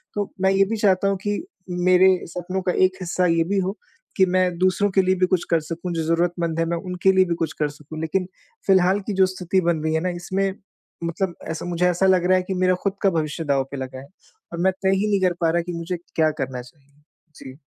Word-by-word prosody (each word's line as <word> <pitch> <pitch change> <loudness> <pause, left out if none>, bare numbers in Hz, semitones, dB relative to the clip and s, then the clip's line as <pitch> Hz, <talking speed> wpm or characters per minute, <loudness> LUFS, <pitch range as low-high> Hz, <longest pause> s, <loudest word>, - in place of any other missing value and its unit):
तो 205 -1 -2
मैं 190 0 +4
ये 195 0 +4
भी 225 - 0
चाहता 200 -2 +2
हूँ 195 - 0
कि 205 0 -1 0.3
मेरे 185 +1 +4
सपनों 180 +2 -4
का 180 - +1 0.2
एक 185 - -13
हिस्सा 180 +1 0
ये 165 -1 +3
भी 200 +1 +1
हो 190 +3 -2 0.4
कि 190 - +6
मैं 185 -1 +1
दूसरों 185 +2 +2
के 190 - +4
लिए 185 0 +2
भी 185 0 +2
कुछ 185 -2 +1
कर 165 - +4
सकूँ, 170 +3 -5
जो 165 -1 -1
ज़रूरतमंद 170 0 0
है, 165 - +2
मैं 170 +1 -1
उनके 180 +1 +1
लिए 190 0 +5
भी 170 -1 -1
कुछ 165 - -1
कर 150 - +2
सकूँ। 150 +2 -10
लेकिन 180 +4 -1 0.4
फिलहाल 190 0 +4
की 210 - -1
जो 190 0 +4
स्थिति 185 0 -1
बन 170 -2 0
रही 160 0 0
है - - +2
ना, 180 - -1
इसमें 190 +2 -2 0.5
मतलब 175 +2 -2 0.2
ऐसा 160 - -5
मुझे 175 0 0
ऐसा 180 +2 +1
लग 185 -2 +3
रहा 185 0 +5
है 185 - 0
कि 190 - -1
मेरा 185 0 +4
खुद 200 - +1
का 195 - +5
भविष्य 160 -1 -2
दाव 140 -2 +2
पे 140 - -5
लगा 130 0 -6
है 135 - -11 0.5
और 170 - -4
मैं 190 +2 +3
तय 190 0 +3
ही 200 +2 0
नहीं 200 -1 +2
कर - - -3
पा 165 - +3
रहा 170 +1 +1
कि 175 +1 -6
मुझे 170 +2 -3 0.2
क्या 155 -1 +3
करना 130 -2 -3
चाहिए। 135 +3 -19 0.4
जी। 130 0 -11
180 Hz, 250 wpm, -23 LUFS, 165-190 Hz, 0.5 s, कि